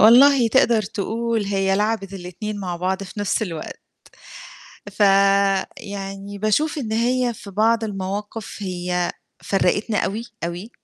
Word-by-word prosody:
والله 250 +2 +7
تقدر 230 -2 +4
تقول 220 +2 -2
هي 195 -1 +1
لعبِت 210 -2 -1
الاتنين 195 +3 -6
مع 180 -3 -3
بعض 185 +2 -1
في 195 +2 -7
نفس 205 +2 0
الوقت، 165 -7 -5 1.1
فيعني 195 0 +1
باشوف 255 +10 +1
إن 225 -6 -3
هي 240 +2 +1
في 200 - -10
بعض 225 +3 +2
المواقف 205 +2 -5
هي 180 -1 -1 0.3
فرّقِتنا 205 +3 +1
أوي، 215 +4 -1 0.2
أوي. 175 +6 -5
205 Hz, 120 wpm, -22 LUFS, 195-225 Hz, 1.1 s, والله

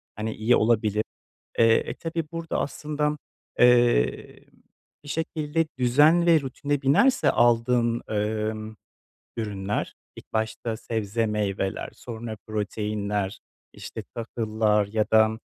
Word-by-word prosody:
hani, 110 +1 -3
iyi 115 +3 +2
olabilir. 110 -1 +2 0.6
Eee, 115 0 +6 0.2
e, - - -3
tabii 165 0 -4
burada 165 -1 -3
aslında, 150 +1 -2 0.4
eee, 120 - +3 0.6
bir - - -11
şekilde 160 0 -1
düzen 150 +8 +4
ve 165 -2 +6
rutine 140 +1 -3
binerse 245 - +4
aldığın, 120 0 +2
emm, 110 +1 -2 0.6
ürünler 105 -3 -3 0.2
ilk - - -14
başta 110 +1 -2
sebze, 110 0 -2
meyveler, 100 -2 -2
sonra 115 -2 -7
proteinler, 105 -1 -2 0.3
işte, - - -8
tahıllar 110 -2 0
ya 105 +1 0
da, 110 0 +4
115 Hz, 110 wpm, -25 LUFS, 105-135 Hz, 0.6 s, Eee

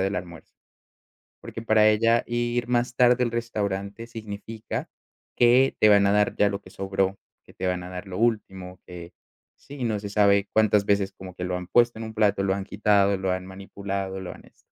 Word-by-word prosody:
del 95 +2 0
almuerzo 85 -3 -9 0.9
porque - - -8
para 110 -1 +3
ella 115 +2 +3
ir 120 0 -2
más 120 0 0
tarde 125 0 +4
al 120 - -2
restaurante 105 -2 -3
significa 110 -1 -7 0.5
que 125 +2 +4
te 110 - +6
van 100 -1 +5
a 100 - +3
dar 105 0 +2
ya 105 - +3
lo 100 0 -4
que 95 - -15
sobró, 95 0 -2 0.3
que - - -18
te - - -5
van 90 -1 -1
a 90 - -9
dar 90 +2 -7
lo 95 -1 -7
último, 95 -5 -2
que, 85 -1 -10 0.4
sí, 140 -3 -8
no 110 -3 -1
se 100 - -6
sabe 100 -1 +3
cuántas 105 -2 +3
veces 100 -1 +1
como 95 -1 -11
que 90 - -5
lo 90 0 -2
han 90 - -8
puesto 120 +3 +2
en 115 - -5
un 110 - -9
plato, 105 -3 +2
lo 95 - +1
han 100 0 -4
quitado, 100 -1 +2
lo 95 0 -2
han 95 0 -2
manipulado, 95 0 -5
lo 95 - -7
han - - -14
esto, - - -26
100 Hz, 205 wpm, -25 LUFS, 95-115 Hz, 0.9 s, te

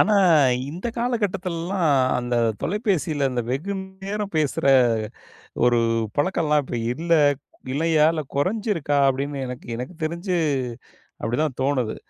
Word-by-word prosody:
ஆனா. 210 - +4 0.6
இந்த 175 +9 -5
காலகட்டத்துலலாம். 190 -6 -1 0.3
அந்த 120 0 -2 0.3
தொலைபேசியில 170 - 0
அந்த 125 -1 -1
வெகுநேரம் 195 +6 -4
பேசுற 150 -2 0 1.0
ஒரு 120 -1 +4 0.4
பழக்கோல்லாம் 150 -1 +2
இப்ப 120 - -4 0.2
இல்ல 165 +5 0 0.6
இல்லையா 155 +2 +3
இல்ல 160 - -2
குறைஞ்சிருக்கா 185 -2 0
அப்படின்னு 140 +2 -1
எனக்கு 125 0 -7
எனக்கு 125 +8 -6
தெரிஞ்சு 170 +4 -2 0.9
அப்படிதான் 130 +4 -1
தோணுது. 130 -5 0
160 Hz, 105 wpm, -23 LUFS, 140-190 Hz, 1.0 s, ஆனா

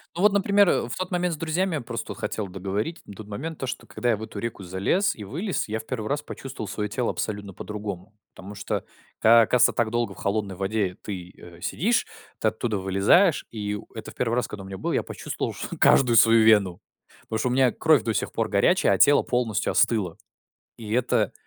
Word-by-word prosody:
Ну 175 - -3
вот, 205 0 +5
например, 200 -1 +4
э, - - +1
в - - -4
тот 185 0 -4
момент 180 -1 0
с - - -5
друзьями, 165 +2 -1
просто 115 -2 -6
вот - - -15
хотел 105 0 -3
договорить. 100 - -4
На - - -10
тот 105 +1 -10
момент 150 +10 -6
то, 130 - -3
что - - -5
когда 120 - -2
я 115 - +2
в 110 - -7
эту 110 - -7
реку 115 -2 -5
залез 95 - 0
и 105 - -8
вылез, 170 - -3
я 110 +1 -3
в 110 - -10
1 110 -4 -4
раз 145 +4 -1
почувствовал 135 -6 -7
своё 105 +1 -3
тело 120 +3 -1
абсолютно 100 -2 -4
по-другому. 105 -1 -7 0.2
Потому 100 +2 -10
что 100 - -3 0.4
как 115 0 +6
оказывается, 125 -1 +4
так 115 -2 0
долго 120 -4 -1
в - - -19
холодной 100 -1 -2
воде 95 0 -1
ты, 90 -4 -6
э, 85 -1 -14
сидишь, 230 - +1 0.3
ты - - +1
оттуда 110 0 -3
вылезаешь. 100 - +3
И 105 -2 -3
у 105 - -8
это 110 - -8
в - - -18
1 120 -2 0
раз, 125 - 0
когда 100 -2 -8
у - - -10
меня 95 0 -7
было, - - -2
я - - +1
почувствовал - - -5
чт - - -6
каждую 120 -3 +5
свою 115 0 +6
вену. 105 -5 +4 0.4
Потому 110 - -4
что 120 - 0
у - - -1
меня 130 -1 +4
кровь 155 -7 +3
до 115 0 -1
сих 105 - -2
пор 115 -1 -1
горячая, 140 - +3
а - - +1
тело 145 - +6
полностью 115 -4 0
остыло. 100 -8 +1 0.6
И 110 -2 -7
это 120 -3 +1
110 Hz, 225 wpm, -25 LUFS, 100-130 Hz, 0.6 s, как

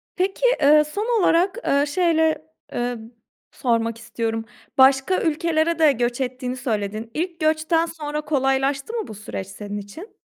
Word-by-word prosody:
Peki, 385 +6 0 0.2
eee, 300 +2 +6
son 425 +9 -1
olarak, 365 +5 +3
eee, 280 +1 +3
şeyle, 320 -1 +2 0.3
emm, 240 -1 -4 0.4
sormak 230 -3 0
istiyorum. 225 -1 -3 0.3
Başka 270 +7 +4
ülkelere 325 0 +1
de 310 -2 +6
göç 240 0 -1
ettiğini 255 0 -3
söyledin. 215 -1 -3
İlk 340 +1 -3
göçten 315 +1 +2
sonra 300 -2 -4
kolaylaştı 270 - 0
mı 450 -3 -3
bu - - -8
süreç 200 -2 -6
senin 205 +1 -7
için? 205 - -10
285 Hz, 140 wpm, -22 LUFS, 240-330 Hz, 0.4 s, eee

